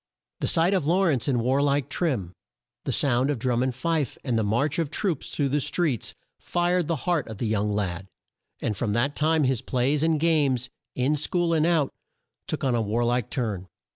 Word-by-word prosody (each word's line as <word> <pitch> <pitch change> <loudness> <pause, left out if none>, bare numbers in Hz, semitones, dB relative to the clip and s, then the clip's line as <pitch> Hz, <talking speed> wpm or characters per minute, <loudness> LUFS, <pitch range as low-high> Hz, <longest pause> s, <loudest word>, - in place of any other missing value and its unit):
The - - -1
sight 170 +4 +3
of 180 -7 +1
Law 180 +4 +3
rence 140 -8 +1
in 135 -3 +2
war 130 +4 +2
like 140 -2 +1
trim, 120 - -1 0.5
the - - -1
sound 130 -1 +2
of 145 - 0
drum 120 +1 0
and 130 - +2
fife, 160 -4 -1
and 125 -4 -1
the 110 - +2
march 120 +10 +1
of 165 -4 0
troops 170 -2 -1
through 140 -2 -1
the 145 +2 +1
streets, 140 - -1 0.2
fired 175 -1 0
the 165 - +1
heart 175 -5 +1
of 110 -2 -7
the 120 - -2
young 105 -1 0
lad, 95 -2 -2 0.5
and 110 -3 -2
from 105 0 -1
that 135 +6 +1
time 155 0 +2
his 130 -3 +1
plays 130 +3 0
and 160 -1 +2
games, 140 -6 +2 0.2
in 130 +4 +1
school 170 +3 0
and 160 0 +3
out, 160 -5 +2 0.6
took - - -3
on 130 -2 +2
a 120 - +2
war 110 +3 0
like 120 -1 0
turn. 105 -7 -3
135 Hz, 205 wpm, -26 LUFS, 120-160 Hz, 0.6 s, sight